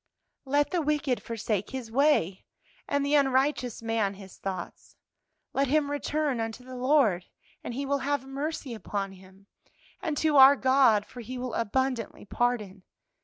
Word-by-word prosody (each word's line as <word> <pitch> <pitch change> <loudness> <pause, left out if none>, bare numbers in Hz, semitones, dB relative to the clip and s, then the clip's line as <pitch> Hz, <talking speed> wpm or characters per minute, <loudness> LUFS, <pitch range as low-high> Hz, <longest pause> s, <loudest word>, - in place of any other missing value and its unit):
"'Let 285 +2 +1
the 355 -2 +1
wicked 295 -4 0
forsake 215 -3 -3
his 255 -4 -6
way, 250 - +2 0.4
and 285 0 0
the 285 - 0
unrighteous 265 -4 +1
man 225 -3 0
his 195 -1 -13
thoughts; 195 -1 -6 0.6
let 275 +1 +1
him 285 +1 +1
return 290 -2 -1
unto 225 +2 -4
the 255 0 -9
Lord, 250 -9 +2 0.4
and 240 - -5
He 275 +2 -3
will 280 +1 0
have 285 -1 -1
mercy 275 -1 -4
upon 200 -3 -4
him, 190 +1 -17 0.6
and 305 -3 -2
to 310 -2 +2
our 270 +1 +9
God, 260 -6 +4
for 245 - -10
He 250 +3 -7
will 250 -1 -4
abundantly 245 0 -1
pardon.' 210 -4 -1
255 Hz, 155 wpm, -28 LUFS, 220-285 Hz, 0.6 s, our